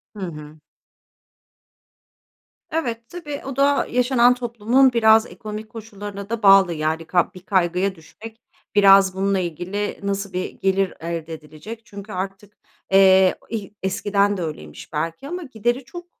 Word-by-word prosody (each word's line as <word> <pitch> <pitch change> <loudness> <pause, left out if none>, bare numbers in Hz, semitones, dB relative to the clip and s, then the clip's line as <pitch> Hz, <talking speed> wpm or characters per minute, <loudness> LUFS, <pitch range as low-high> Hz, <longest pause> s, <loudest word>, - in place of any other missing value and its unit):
Hı - - -9
hı. 155 -4 -8 2.1
Evet, 240 -8 -2
tabii 295 -5 -7
o 270 -1 -5
da 280 +1 +2
yaşanan 250 0 +4
toplumun 245 +2 +2
biraz 220 -1 +5
ekonomik 215 -1 -8
koşullarına 205 -2 -8
da 230 -1 -4
bağlı, 195 -3 +6
yani, 160 +1 -2
kab 175 +3 +1
bir - - -9
kaygıya 185 0 +1
düşmek, 220 +8 -13 0.3
biraz 195 -2 +6
bununla 195 0 +1
ilgili 185 +4 -4
nasıl 200 -1 -3
bir 185 0 -3
gelir 195 0 +1
elde 165 -1 -5
edilecek? 160 +9 -10
Çünkü 200 0 -10
artık, 195 +2 -6 0.3
eee, 190 -1 +6
ih 215 -3 -4
eskiden 200 +1 +1
de - - -4
öyleymiş 75 - -8
belki 165 - -3
ama 355 +3 -5
gideri 240 -1 -2
çok, 350 +7 -9
200 Hz, 135 wpm, -22 LUFS, 185-230 Hz, 2.1 s, bağlı